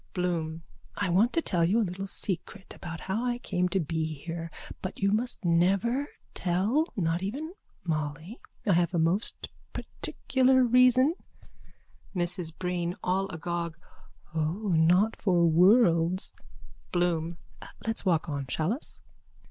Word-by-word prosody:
BLOOM: 165 -3 -1 0.3
I 200 -2 0
want 200 +8 +4
to 330 - +1
tell 175 -3 +1
you 195 +7 +3
a 225 - +2
little 190 +2 -5
secret 190 +1 -3
about 165 -3 -7
how 200 +5 -2
I 245 -1 0
came 180 -6 -1
to 195 - +1
be 160 -1 -2
here. 165 +3 -6 0.3
But 185 - -5
you 195 0 +2
must 225 -1 0
never 195 +11 +2 0.3
tell. 200 - +1
Not 170 -2 0
even 280 - -4 0.3
Molly. 155 - -3 0.3
I 200 - +4
have 175 +1 +2
a - - +2
most 170 +6 0 0.2
particular 260 0 +1
reason. 255 +4 +5 1.0
MRS 175 -2 -1
BREEN: 180 -1 -2
(All 190 +2 0
agog.) 170 0 -3 0.6
O, 165 +7 -1
not 180 +6 +3
for 175 -4 +4
worlds. 175 0 +4 0.6
BLOOM: 170 -2 0 0.5
Let's 225 0 -1
walk 170 -5 +2
on. 140 -3 -3
Shall 155 +9 0
us? 275 - -5
180 Hz, 135 wpm, -28 LUFS, 165-210 Hz, 1.0 s, reason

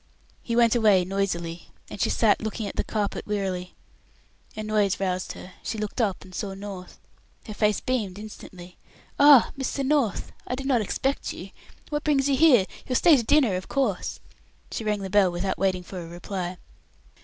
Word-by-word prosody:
He 230 - -3
went 235 0 +4
away 210 -6 +4
noisily, 175 -3 -3 0.2
and 200 - -7
she - - +2
sat 215 -3 +3
looking 220 0 -3
at - - -6
the - - 0
carpet 210 -2 -3
wearily. 190 -3 -3 0.8
A 215 - -4
noise 210 -2 +1
roused 185 -1 -2
her. 180 - -11
She 225 - -4
looked 210 +3 -3
up 200 -5 -1
and 185 - -15
saw 195 +1 -4
North. 195 -2 -9 0.5
Her 215 - -7
face 210 -1 +1
beamed 215 -7 -2
instantly. 185 -4 -11 0.4
"Ah! 285 -4 +8
Mr. 270 0 -2
North, 275 -7 +1 0.2
I 250 - -1
did 270 +1 -6
not 260 -4 +2
expect 270 +6 -2
you. 190 +2 -9 0.4
What 295 0 -2
brings 285 -2 +2
you 280 - +3
here? 260 -9 +6 0.2
You'll 255 - -1
stay 330 +4 +6
to 260 - +2
dinner, 235 -4 +3
of 185 - -7
course." 255 -10 -1 0.5
(She - - -4
rang 210 -1 -1
the 190 -1 -5
bell 200 -3 +4
without 180 +2 -2
waiting 185 -2 +1
for 185 +1 -8
a 165 - -8
reply.) 175 +1 -5
205 Hz, 185 wpm, -25 LUFS, 185-245 Hz, 0.8 s, Ah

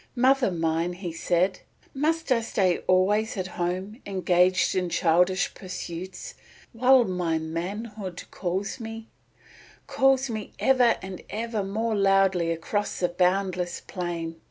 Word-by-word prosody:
"Mother 260 -1 +4
mine," 165 0 -1
he 175 -1 -6
said, 180 +3 +1 0.3
"must 320 +2 0
I 235 -2 +4
stay 190 -5 +1
always 205 +4 +2
at 185 - -2
home 185 +5 -4
engaged 185 -1 +2
in 180 -2 0
childish 180 +3 +2
pursuits 185 - -7 0.4
while 255 +2 +5
my 180 -5 -1
manhood 185 +4 -5
calls 190 +6 -3
me, 225 0 -7 0.8
calls 270 0 +3
me 215 -4 -5
ever 255 -3 +4
and 190 -1 -7
ever 225 -1 -2
more 220 +4 -1
loudly 195 -3 +3
across 165 +5 -2
the 180 - +1
boundless 180 0 0
plain? 170 -3 -5
190 Hz, 125 wpm, -26 LUFS, 175-225 Hz, 0.8 s, while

